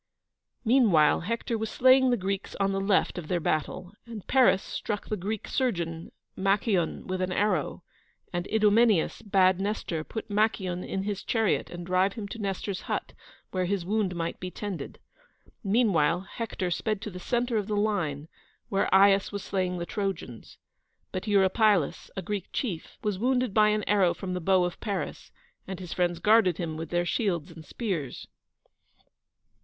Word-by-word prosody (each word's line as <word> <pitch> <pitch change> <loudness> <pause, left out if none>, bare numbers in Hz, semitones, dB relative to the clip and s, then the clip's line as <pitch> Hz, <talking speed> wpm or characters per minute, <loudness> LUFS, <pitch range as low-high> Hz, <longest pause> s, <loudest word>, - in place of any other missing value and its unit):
Meanwhile, 220 - +5
Hector 230 +4 -2
was 220 0 -2
slaying 260 +2 +5
the 245 - +2
Greeks 195 0 -3
on 195 0 +2
the 195 0 -1
left 195 -2 +1
of 160 - -8
their 175 0 0
battle, 170 +4 -2
and 225 -4 -8
Paris 255 -7 +4
struck 210 -2 -4
the 215 - -1
Greek 205 +2 -4
surgeon, 170 -10 -2 0.2
Machaon, 195 -2 +1
with 185 0 -3
an 185 0 -1
arrow; 185 -6 0 0.5
and 175 0 -2
Idomeneus 215 -3 +3
bade 190 -3 +3
Nestor 195 -5 -2
put 220 - -6
Machaon 200 -4 0
in 195 - -3
his 200 -1 -3
chariot 225 -3 +1
and 175 0 -7
drive 185 +2 +2
him 215 -4 -6
to 230 - -7
Nestor's 195 -1 -3
hut, - - -2 0.4
where 185 -1 0
his 185 -1 -1
wound 200 -2 0
might 165 0 -3
be 185 - -5
tended. 185 -6 -6 0.7
Meanwhile, 190 -7 +2
Hector 190 -2 -4
sped 215 +3 -1
to 210 - -5
the 180 - -8
centre 240 +3 0
of 205 -2 -1
the 210 -1 -1
line, 170 -9 -1 0.4
where 195 - 0
Aias 195 +1 +5
was 200 -1 -5
slaying 185 -2 -1
the 170 - -3
Trojans; 185 - -5 0.5
but 185 +3 -4
Eurypylus, 200 -3 +2
a 190 - -3
Greek 200 0 -3
chief, 190 - -4
was 205 -3 -1
wounded 250 -1 +1
by 215 0 +5
an 210 0 0
arrow 195 -4 +3
from 185 -2 -5
the 180 - -3
bow 185 +1 +3
of 175 -1 -3
Paris, 200 -3 -4 0.4
and 190 -1 -5
his 180 -3 -6
friends 175 -1 0
guarded 210 -2 +4
him 165 -3 -3
with 160 0 -6
their 175 0 0
shields 175 -5 -1
and 160 -1 -11
spears. 175 - -4
195 Hz, 170 wpm, -28 LUFS, 175-215 Hz, 0.7 s, Meanwhile